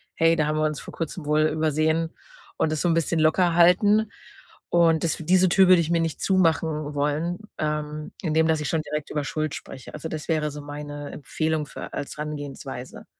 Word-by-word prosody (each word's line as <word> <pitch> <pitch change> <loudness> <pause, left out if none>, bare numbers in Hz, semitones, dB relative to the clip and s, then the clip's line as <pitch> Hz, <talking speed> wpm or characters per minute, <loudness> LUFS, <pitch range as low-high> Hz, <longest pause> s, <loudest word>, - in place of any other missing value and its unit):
hey, 165 0 +4
da 155 - +2
haben 155 - 0
wir 155 - +2
uns 150 -2 -1
vor - - -10
Kurzem 165 0 -5
wohl 150 +1 +2
übersehen“, 155 +1 +1 0.4
und 155 - +1
das 155 - -1
so 175 - +1
'n - - +3
bisschen 165 0 +1
locker 170 +3 +3
halten. 205 +5 +5 0.6
Und 165 -2 +3
das 165 -3 +1
diese 180 +3 +3
Tür 190 +2 +5
würde 180 -2 +7
ich 165 0 -2
mir 170 -1 +2
nicht 165 -2 -2
zumachen 160 -5 +1
wollen, 150 +5 0 0.2
ähm, 150 0 -3
indem 160 0 +2
dass 160 -1 +2
ich 150 - -2
schon 160 - 0
direkt 150 -1 -5
über 150 -1 -1
Schuld 155 0 -2
spreche. 130 -2 -10
Also, 150 +2 -6
das 155 -1 -6
wäre 155 -2 +1
so 145 0 -8
meine 145 0 -7
Empfehlung 155 +2 -2
für - - -9
als 145 - -5
Herangehensweise. 145 -4 -6
155 Hz, 200 wpm, -25 LUFS, 150-165 Hz, 0.6 s, würde